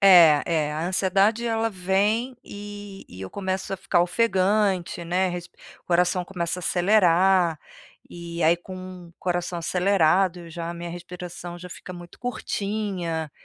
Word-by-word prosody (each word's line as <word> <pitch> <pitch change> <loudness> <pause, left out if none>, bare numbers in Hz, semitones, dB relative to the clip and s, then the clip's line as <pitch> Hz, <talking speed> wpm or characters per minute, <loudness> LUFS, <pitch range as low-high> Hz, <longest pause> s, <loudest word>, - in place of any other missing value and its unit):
É 170 -7 +8
é 155 -3 0
a 155 +3 -2
ansiedade, 195 +5 +2
ela 225 0 0
vem 205 +6 0
e 205 -1 -9
e 90 - -11
eu 95 - -6
começo 190 -1 -3
a - - -1
ficar 185 -1 +1
ofegante, 190 -2 +1
né, 180 +2 +1
resp 175 0 -6 0.3
coração 180 +1 +2
começa 175 -1 -3
a - - -11
acelerar, 180 -2 +3 0.5
e 170 0 -6
aí, 160 +2 +5
com 185 0 -9
o 170 - -21
coração 175 -1 -2
acelerado, 180 0 +2
eu 170 -1 -11
já 165 +1 -5
a - - -6
minha 170 0 -6
respiração 175 0 -8
já 180 +1 -10
fica 180 - -9
muito 175 -1 -11
curtinha, 195 -9 -3
180 Hz, 150 wpm, -25 LUFS, 170-195 Hz, 0.5 s, É